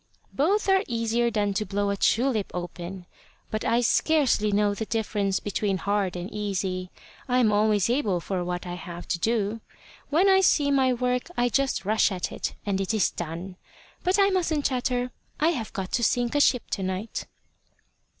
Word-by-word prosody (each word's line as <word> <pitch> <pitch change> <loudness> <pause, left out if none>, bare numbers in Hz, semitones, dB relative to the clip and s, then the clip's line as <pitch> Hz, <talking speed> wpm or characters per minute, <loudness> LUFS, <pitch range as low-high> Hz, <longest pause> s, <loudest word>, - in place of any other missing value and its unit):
"Both 390 +10 +1
are 385 0 +4
easier 235 0 0
than 205 -3 0
to 205 - 0
blow 200 0 -1
a - - 0
tulip 225 +1 +1
open. 175 +1 -6 0.5
But 215 - -2
I 235 +1 +2
scarcely 250 -5 +2
know 205 0 +2
the 220 +1 -4
difference 205 -3 0
between 205 -1 -1
hard 200 -1 -1
and 175 0 -4
easy. 190 -3 -2 0.4
I 250 -1 +2
am 235 -4 +4
always 210 -2 +3
able 230 -7 +1
for 180 +1 -3
what 180 +1 -4
I 175 - -5
have 175 0 -8
to 170 - 0
do. 220 +1 0 0.5
When 335 +7 +3
I 385 0 +6
see 290 -6 +3
my 265 -2 +3
work, 250 0 0
I 245 0 +2
just 265 -6 0
rush 215 +1 +3
at 185 -2 -3
it - - -4
and 195 -2 0
it 195 +3 -1
is 210 - +2
done. 175 +3 -6 0.5
But 365 +2 +2
I 395 0 +4
mustn't 330 -6 0
chatter. 250 -1 0 0.3
I 315 +2 +4
have 245 -10 -3
got 190 -2 -5
to 235 - 0
sink 240 0 +1
a 290 - +2
ship 250 -4 +2
to 195 - -1
night." 190 +4 -4
215 Hz, 185 wpm, -26 LUFS, 195-250 Hz, 0.5 s, I